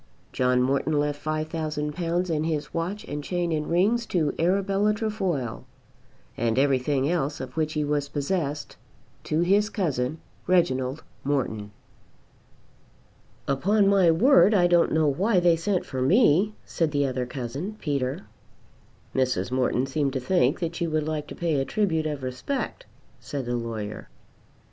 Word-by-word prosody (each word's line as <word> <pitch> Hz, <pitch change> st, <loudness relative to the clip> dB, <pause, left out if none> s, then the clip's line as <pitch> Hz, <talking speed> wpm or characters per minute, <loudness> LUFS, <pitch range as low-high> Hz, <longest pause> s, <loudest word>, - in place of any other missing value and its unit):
John 125 Hz, 0 st, +2 dB
Morton 140 Hz, +3 st, +1 dB
left 145 Hz, 0 st, -2 dB
£5,000 155 Hz, +2 st, -2 dB
and 155 Hz, +1 st, -1 dB
his 155 Hz, -3 st, -3 dB
watch 180 Hz, +5 st, -3 dB
and 145 Hz, 0 st, -5 dB
chain 175 Hz, +1 st, -1 dB
and 150 Hz, -1 st, -1 dB
rings 215 Hz, +8 st, +2 dB
to 155 Hz, -5 st, 0 dB
Arabella 195 Hz, +4 st, +2 dB
Trefoil, 190 Hz, -, -2 dB, 0.7 s
and 115 Hz, 0 st, 0 dB
everything 135 Hz, 0 st, +2 dB
else 150 Hz, -3 st, -1 dB
of 130 Hz, -1 st, -7 dB
which 155 Hz, -1 st, -1 dB
he 150 Hz, -, 0 dB
was 145 Hz, -1 st, -1 dB
possessed 145 Hz, 0 st, -2 dB, 0.5 s
to 155 Hz, +2 st, 0 dB
his 200 Hz, +4 st, +3 dB
cousin 155 Hz, -, -1 dB, 0.3 s
Reginald 140 Hz, -5 st, +1 dB, 0.2 s
Morton. 120 Hz, -7 st, -1 dB, 1.8 s
"Upon 195 Hz, +9 st, +2 dB
my 195 Hz, -3 st, +5 dB
word 220 Hz, -, +5 dB
I 180 Hz, -3 st, +4 dB
don't 175 Hz, -1 st, +4 dB
know 160 Hz, -1 st, +3 dB
why 185 Hz, +8 st, +2 dB
they 175 Hz, -1 st, +4 dB
sent 185 Hz, +2 st, -1 dB
for 130 Hz, -2 st, -4 dB
me," 200 Hz, -, +4 dB
said 165 Hz, -3 st, 0 dB
the 145 Hz, -1 st, +1 dB
other 130 Hz, -2 st, -2 dB
cousin, 135 Hz, -, -5 dB
Peter. 140 Hz, +3 st, -2 dB, 0.9 s
"Mrs. 125 Hz, -6 st, 0 dB
Morton 130 Hz, 0 st, +1 dB
seemed 135 Hz, 0 st, -1 dB
to 130 Hz, -, -1 dB
think 135 Hz, +1 st, +2 dB
that 170 Hz, +1 st, -3 dB
you 170 Hz, -, 0 dB
would 155 Hz, -1 st, -1 dB
like 155 Hz, -1 st, -3 dB
to -, -, -8 dB
pay 160 Hz, -5 st, 0 dB
a -, -, +1 dB
tribute 160 Hz, 0 st, 0 dB
of 145 Hz, -3 st, -4 dB
respect," 130 Hz, -, -4 dB, 0.3 s
said 130 Hz, +1 st, -5 dB
the 120 Hz, 0 st, -1 dB
lawyer. 110 Hz, -3 st, -5 dB
155 Hz, 150 wpm, -26 LUFS, 135-180 Hz, 1.8 s, my